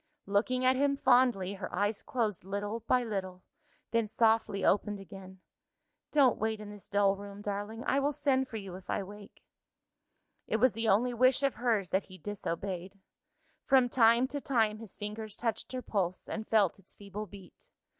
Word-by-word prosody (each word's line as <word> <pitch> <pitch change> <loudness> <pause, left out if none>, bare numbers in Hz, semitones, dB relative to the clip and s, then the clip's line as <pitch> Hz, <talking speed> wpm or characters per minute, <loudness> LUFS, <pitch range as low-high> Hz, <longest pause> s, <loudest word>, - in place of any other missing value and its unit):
Looking 235 +6 +1
at 260 +1 +5
him 280 +1 +2
fondly, 245 -8 +3
her 190 -2 -6
eyes 205 +1 0
closed 220 -8 -2
little 205 +3 -3
by 250 -1 +3
little 190 -5 -4 0.5
then 230 -2 +1
softly 220 -3 +2
opened 205 0 +2
again. 190 -1 -11 0.7
"Don't 275 -6 +4
wait 220 0 -1
in 210 -1 -8
this 205 -3 -9
dull 200 -1 +3
room, 200 0 -9
darling; 205 +3 -4
I 275 - +2
will 285 +1 +1
send 265 -2 +1
for 225 - -6
you, 195 -3 -7
if 185 +1 -11
I 200 - -1
wake." 205 +1 -13 1.0
It - - -1
was 250 0 +4
the 225 +1 -1
only 240 +5 +3
wish 255 +3 +4
of 275 - +2
hers 220 -7 0
that 190 - +1
he 185 - -12
disobeyed. 190 0 -5 0.6
From 260 -3 +4
time 235 +1 +5
to 285 0 -4
time, 220 -6 +1
his 225 -4 -10
fingers 210 0 -5
touched 230 -2 -2
her 255 -1 -4
pulse, 185 -3 -2
and 220 0 -5
felt 205 -5 +2
its 195 - -15
feeble 205 +1 -7
beat. 195 -1 -14
210 Hz, 175 wpm, -31 LUFS, 200-240 Hz, 1.0 s, at